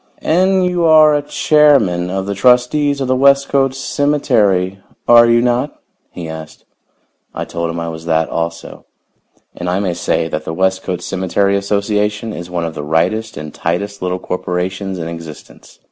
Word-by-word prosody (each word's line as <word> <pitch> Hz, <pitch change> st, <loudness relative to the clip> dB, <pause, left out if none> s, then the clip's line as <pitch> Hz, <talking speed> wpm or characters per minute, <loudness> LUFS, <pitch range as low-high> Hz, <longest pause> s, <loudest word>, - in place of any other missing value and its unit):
"And 185 Hz, +2 st, +2 dB
you 180 Hz, -1 st, 0 dB
are 155 Hz, -2 st, +5 dB
chairman 140 Hz, -, +2 dB
of 95 Hz, +1 st, -3 dB
the 100 Hz, -, -3 dB
trustees 125 Hz, +6 st, +2 dB
of 135 Hz, -, -1 dB
the 130 Hz, -, +1 dB
Westcote 140 Hz, 0 st, +3 dB
Cemetery, 110 Hz, -11 st, 0 dB, 0.3 s
are 120 Hz, 0 st, +7 dB
you 120 Hz, 0 st, +4 dB
not?" 125 Hz, +4 st, -1 dB, 0.3 s
he 85 Hz, -2 st, -8 dB
asked. 80 Hz, 0 st, -9 dB, 0.7 s
I -, -, -4 dB
told 85 Hz, 0 st, -4 dB
him 85 Hz, 0 st, -4 dB
I 85 Hz, -, -4 dB
was 80 Hz, 0 st, -7 dB
that 80 Hz, -1 st, +1 dB
also. 85 Hz, 0 st, -5 dB, 0.7 s
And 90 Hz, 0 st, -4 dB
I 90 Hz, +2 st, 0 dB
may 95 Hz, -3 st, -1 dB
say 85 Hz, -1 st, -1 dB
that 75 Hz, -1 st, -4 dB
the 80 Hz, -, -5 dB
Westcote 95 Hz, -1 st, -1 dB
Cemetery 95 Hz, +1 st, 0 dB
Association 105 Hz, +2 st, -1 dB
is 85 Hz, -2 st, -7 dB
one 85 Hz, -1 st, -2 dB
of 80 Hz, -, -4 dB
the -, -, -6 dB
rightest 90 Hz, +9 st, -1 dB
and 75 Hz, 0 st, -7 dB
tightest 100 Hz, +4 st, -3 dB
little 90 Hz, 0 st, -1 dB
corporations 95 Hz, +2 st, -3 dB
in 80 Hz, -2 st, -5 dB
existence. 85 Hz, -2 st, -11 dB
100 Hz, 160 wpm, -16 LUFS, 85-130 Hz, 0.7 s, are